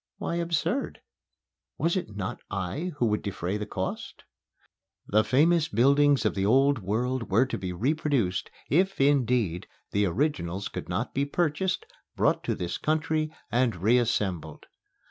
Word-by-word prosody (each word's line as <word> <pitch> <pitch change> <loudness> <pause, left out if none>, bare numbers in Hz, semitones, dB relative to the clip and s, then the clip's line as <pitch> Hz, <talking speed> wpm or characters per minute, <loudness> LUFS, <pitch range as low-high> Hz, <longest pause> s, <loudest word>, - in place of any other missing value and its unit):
Why 170 - -3
absurd? 170 - -1 0.8
Was 170 +3 +1
it 110 - -3
not 100 -2 -4
I 100 - -3
who 125 - +2
would 105 -2 +1
defray 95 -1 -3
the 105 0 -5
cost? 95 -2 -5 0.8
The 110 +2 +3
famous 155 +8 +3
buildings 140 0 +4
of 105 - +2
the 95 - -1
Old 135 +5 +4
World 115 +5 -2
were 110 +7 +4
to 130 - -4
be 95 -1 -4
reproduced, 125 - 0 0.2
if, 190 +5 +2
indeed, 125 - +2 0.2
the 100 0 +2
originals 95 - -1
could - - -7
not 105 +7 -2
be 140 +1 +1
purchased, 175 +4 -1 0.3
brought - - +2
to - - 0
this 85 -1 -4
country 155 0 0 0.2
and 120 -2 +2
reassembled. 100 -6 0
120 Hz, 145 wpm, -27 LUFS, 100-150 Hz, 0.8 s, buildings